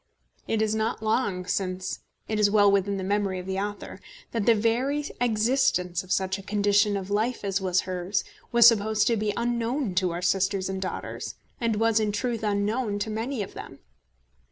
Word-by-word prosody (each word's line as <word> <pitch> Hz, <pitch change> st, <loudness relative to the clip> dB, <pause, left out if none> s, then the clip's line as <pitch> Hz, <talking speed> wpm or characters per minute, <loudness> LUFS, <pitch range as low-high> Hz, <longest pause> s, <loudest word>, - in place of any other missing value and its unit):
It 220 Hz, -1 st, +1 dB
is 215 Hz, 0 st, 0 dB
not 220 Hz, 0 st, -1 dB
long 205 Hz, -5 st, 0 dB
since, 185 Hz, -1 st, -2 dB, 0.3 s
it 215 Hz, -1 st, -1 dB
is 205 Hz, -1 st, +4 dB
well 205 Hz, -1 st, +5 dB
within 200 Hz, 0 st, +1 dB
the 190 Hz, -, -4 dB
memory 200 Hz, -1 st, 0 dB
of 180 Hz, -, -6 dB
the 190 Hz, 0 st, -2 dB
author, 205 Hz, +1 st, -5 dB, 0.3 s
that 225 Hz, -3 st, -2 dB
the 230 Hz, -, +6 dB
very 250 Hz, +7 st, 0 dB, 0.2 s
existence 215 Hz, -6 st, +1 dB
of 185 Hz, -, -11 dB
such 190 Hz, 0 st, 0 dB
a -, -, -7 dB
condition 205 Hz, +1 st, +2 dB
of 195 Hz, 0 st, -6 dB
life 220 Hz, +4 st, 0 dB
as 195 Hz, 0 st, -1 dB
was 185 Hz, -1 st, +2 dB
hers, 185 Hz, +1 st, -2 dB, 0.3 s
was 235 Hz, -2 st, +6 dB
supposed 220 Hz, -2 st, +5 dB
to 235 Hz, -, +3 dB
be 210 Hz, -1 st, 0 dB
unknown 235 Hz, 0 st, -1 dB
to 185 Hz, -, 0 dB
our 175 Hz, +1 st, -4 dB
sisters 195 Hz, +1 st, +1 dB
and 190 Hz, 0 st, -3 dB
daughters, 185 Hz, -, -5 dB, 0.2 s
and 230 Hz, -2 st, 0 dB
was, 225 Hz, +1 st, +2 dB
in 215 Hz, -1 st, 0 dB
truth, 230 Hz, +2 st, -2 dB
unknown 210 Hz, +1 st, 0 dB
to 205 Hz, +2 st, -3 dB
many 225 Hz, +2 st, -2 dB
of -, -, -10 dB
them. -, -, -9 dB
205 Hz, 190 wpm, -26 LUFS, 190-225 Hz, 0.3 s, the